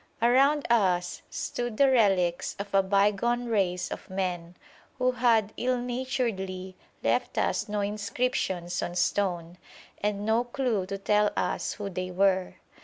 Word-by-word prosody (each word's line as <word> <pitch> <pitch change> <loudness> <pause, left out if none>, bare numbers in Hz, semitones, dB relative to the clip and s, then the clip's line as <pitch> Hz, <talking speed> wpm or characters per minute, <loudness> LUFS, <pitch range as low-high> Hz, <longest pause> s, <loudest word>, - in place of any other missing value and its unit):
Around 275 +5 +4
us 180 -6 +2
stood 240 -3 -4
the 275 -1 +5
relics 190 -8 +2
of 200 0 -7
a 195 - +5
bygone 205 +5 +1
race 190 -6 0
of - - -7
men, 180 -2 -3 0.4
who 255 -1 +2
had 230 -4 +2
ill 255 0 +1
naturedly 230 -7 -3 0.3
left - - 0
us - - 0
no 210 0 -1
inscriptions 200 -4 -2
on 175 - -4
stone, 175 -1 -1 0.4
and 205 0 -1
no 225 +2 +2
clue 240 -6 -1
to 195 - -4
tell 210 +1 +2
us - - -1
who 205 -2 -5
they 185 -1 -4
were. 185 0 +1
205 Hz, 140 wpm, -28 LUFS, 185-240 Hz, 0.4 s, the